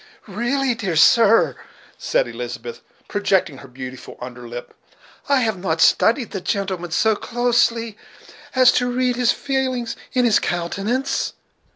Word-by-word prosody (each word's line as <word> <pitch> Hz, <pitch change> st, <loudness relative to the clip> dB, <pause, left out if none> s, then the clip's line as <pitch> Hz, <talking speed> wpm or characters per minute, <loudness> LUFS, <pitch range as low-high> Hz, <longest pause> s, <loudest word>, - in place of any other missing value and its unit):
"Really, 240 Hz, +6 st, -1 dB
dear 195 Hz, -7 st, -3 dB
sir," 230 Hz, +6 st, +5 dB, 0.4 s
said -, -, 0 dB
Elizabeth, 470 Hz, -, -7 dB, 0.3 s
projecting 190 Hz, -8 st, 0 dB
her 135 Hz, -, -12 dB
beautiful 130 Hz, 0 st, -9 dB
under 125 Hz, -1 st, -8 dB
lip, 120 Hz, +1 st, -8 dB, 0.6 s
"I 280 Hz, -2 st, +4 dB
have 220 Hz, -5 st, -1 dB
not 165 Hz, -3 st, -1 dB
studied 230 Hz, +7 st, +3 dB
the 195 Hz, -, -4 dB
gentleman 185 Hz, -3 st, -2 dB
so 220 Hz, +6 st, +2 dB
closely 235 Hz, -1 st, 0 dB, 0.6 s
as 255 Hz, -1 st, +6 dB
to 245 Hz, 0 st, 0 dB
read 250 Hz, 0 st, 0 dB
his 245 Hz, -1 st, +3 dB
feelings 260 Hz, -4 st, -2 dB, 0.2 s
in 250 Hz, -2 st, +2 dB
his 225 Hz, -3 st, +4 dB
countenance. 200 Hz, +10 st, -2 dB
230 Hz, 135 wpm, -21 LUFS, 180-245 Hz, 0.6 s, as